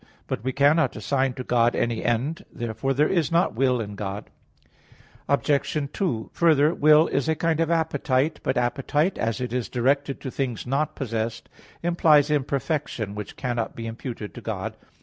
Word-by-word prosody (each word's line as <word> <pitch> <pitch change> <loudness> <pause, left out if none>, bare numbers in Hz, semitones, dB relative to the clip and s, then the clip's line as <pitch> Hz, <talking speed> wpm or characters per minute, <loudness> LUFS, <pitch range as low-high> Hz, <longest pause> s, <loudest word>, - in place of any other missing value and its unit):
But - - -4
we 130 - 0
cannot 145 +5 +3
assign 135 -2 0
to 130 - -5
God 120 -1 +2
any 120 -1 -1
end. 135 +10 -1
Therefore 120 +3 -3
there 150 +3 +3
is 170 -5 +1
not 170 +2 +2
will 125 +1 +2
in 105 -2 -4
God. 100 0 -6 1.0
Obj. 140 +1 +1 0.2
2: 155 - -2
Further, 155 -2 +4
will 155 0 +6
is 140 +3 0
a 160 - +2
kind 165 0 0
of 165 -1 +1
appetite. 150 -3 +1
But 130 - -1
appetite, 140 +8 0
as 115 +1 -1
it 125 -1 -3
is 125 -2 -2
directed 135 +3 0
to 130 - -5
things 125 -5 -3
not 140 +4 -1
possessed, 115 -3 -3 0.3
implies 155 -4 +4
imperfection, 140 -6 -1
which 105 -1 -7
cannot 120 -3 -3
be 115 - -6
imputed 115 -1 -6
to - - -9
God. - - -4
135 Hz, 170 wpm, -25 LUFS, 120-150 Hz, 1.0 s, will